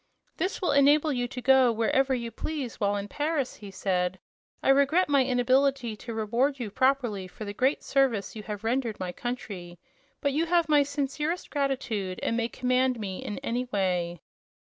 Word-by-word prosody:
"This 370 +1 -2
will - - +2
enable 290 +2 +4
you 245 -1 -1
to 250 0 -7
go 260 -1 +6
wherever 260 +4 +2
you 235 -2 -4
please, 280 -5 -5
while 205 -1 +1
in 200 0 -3
Paris," 295 +1 -2
he 205 - -10
said. 185 -1 -1 0.5
"I - - +2
regret 280 +7 +4
my 280 -2 +4
inability 255 -1 +2
to 230 +2 -7
reward 240 +6 +1
you 225 -4 -4
properly 245 -6 +1
for 215 +4 -9
the 205 - -5
great 260 +7 +1
service 260 -8 +1
you 215 - -6
have 210 0 -6
rendered 235 -1 -1
my 180 -1 -3
country; 190 -6 -6 0.4
but 280 -1 0
you 325 +4 +1
have 340 -1 +3
my 300 -2 +5
sincerest 290 +4 -2
gratitude, 250 -10 -2
and 230 - 0
may 230 -1 0
command 255 0 +1
me 190 -3 -5
in 205 - -5
any 245 +2 -1
way." 180 - -1
250 Hz, 180 wpm, -27 LUFS, 210-275 Hz, 0.5 s, go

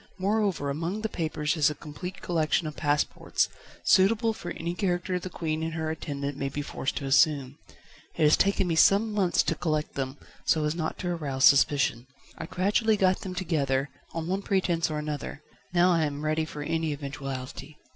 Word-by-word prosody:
Moreover, 195 -7 0
among 170 +8 -3
the 220 - -2
papers 155 -3 -1
is 150 -3 +4
a 150 - -5
complete 180 +6 -8
collection 165 -1 +1
of 155 -1 -5
passports, 145 0 0 0.4
suitable 225 +4 +4
for 175 -5 -7
any 170 0 -3
character 180 -1 -1
the 185 - -6
Queen 160 -2 -3
and 165 0 -3
her 160 -1 -2
attendant 140 -3 -4
may 135 - -1
be 145 +2 -4
forced 135 - -3
to 140 - -3
assume. 140 0 +3 0.6
It - - 0
has 150 0 +6
taken 195 0 +2
me 170 - +1
some 200 +6 +5
months 190 -4 +2
to - - 0
collect 155 -1 -2
them, 135 0 -3 0.3
so 155 -2 +2
as 150 - +1
not 160 -2 -3
to 180 - -3
arouse 145 -6 +1
suspicion; 135 -3 +4 0.3
I - - -7
gradually 210 +5 +2
got 185 -1 +3
them 185 -1 -6
together, 145 -6 0 0.2
on 165 -1 -4
one 190 +2 -1
pretence 180 -5 +1
or 155 - -2
another: 150 0 -5 0.3
now 180 +1 +4
I 165 -2 +3
am 145 +1 -4
ready 155 +1 +1
for 150 -1 -6
any 160 0 -1
eventuality 140 0 -6
160 Hz, 185 wpm, -27 LUFS, 145-180 Hz, 0.6 s, has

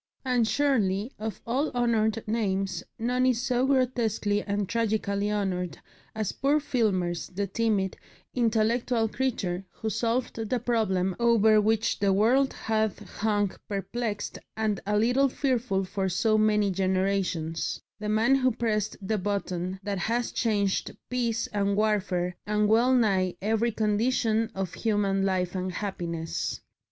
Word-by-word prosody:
And 245 -3 +2
surely 225 -6 +1
of 220 -1 -5
all 265 +6 0
honoured 225 -2 +1
names 195 -4 -1
none 250 +2 +1
is 250 -3 +2
so 250 +1 +1
grotesquely 235 -6 +1
and 200 -1 -2
tragically 210 -2 0
honoured 185 -4 -2 0.4
as 215 -3 -1
poor 285 +3 +2
Filmer's, 195 - 0
the 200 +2 -3
timid, 200 -1 0 0.4
intellectual 230 0 +1
creature 210 -7 -2
who 220 -1 -4
solved 235 +4 -1
the 250 - +1
problem 205 -6 0
over 220 -2 +5
which 220 +1 +1
the 200 -1 +3
world 240 +8 +3
had 220 -1 -1
hung 205 -2 -1 0.2
perplexed 210 +2 -3 0.2
and 215 -3 0
a 210 0 +2
little 250 +5 +3
fearful 245 -8 0
for 190 0 -2
so 215 +5 +2
many 210 -2 +3
generations, 185 -3 -1 0.2
the 210 0 -3
man 220 +5 +3
who 260 -1 +4
pressed 220 -3 -1
the 215 0 0
button 185 -2 -2
that 200 -1 -2
has 230 +6 -1
changed 205 -4 0
peace 235 -2 0
and 200 -1 +1
warfare 190 -4 0
and 210 0 +2
well 235 +4 +4
nigh 190 -7 +2
every 225 +3 +1
condition 220 +1 +1
of 190 -2 -3
human 205 -3 +1
life 185 -2 0
and 185 -1 -3
happiness. 170 -4 -3
215 Hz, 135 wpm, -27 LUFS, 195-235 Hz, 0.4 s, over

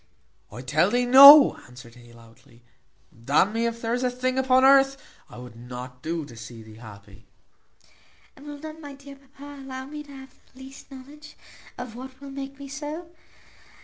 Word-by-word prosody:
"I 120 +4 -10
tell 150 +8 +1
thee 245 +3 0
noa," 280 +3 +8
answered 125 -1 -15
he 120 -1 -18
loudly, 115 +1 -21 0.5
"d 115 +4 -12
n 195 +7 +3
me 230 +1 -1
if 230 0 -6
there 230 +1 -2
is 245 - -2
a 250 - 0
thing 255 +1 -3
upon 260 0 +3
earth 275 0 +4 0.3
I - - -13
would 125 -1 -12
not 125 +1 -10
do 165 -1 -4
to 120 - -14
see 115 0 -11
thee 110 0 -15
happy." 100 -3 -15 1.1
"And 285 +2 -15
will 290 0 -8
not 310 +2 -11
my 285 -2 -10
dear 275 0 -14
papa 280 +1 -14
allow 260 -1 -8
me 300 +2 -9
to 290 -1 -15
have 265 -1 -13
the 260 - -25
least 270 +1 -14
knowledge 285 +3 -14 0.4
of 230 -2 -9
what 260 +1 -11
will 280 0 -11
make 275 0 -8
me 280 0 -10
so? 300 +4 -8
255 Hz, 190 wpm, -24 LUFS, -, 1.1 s, noa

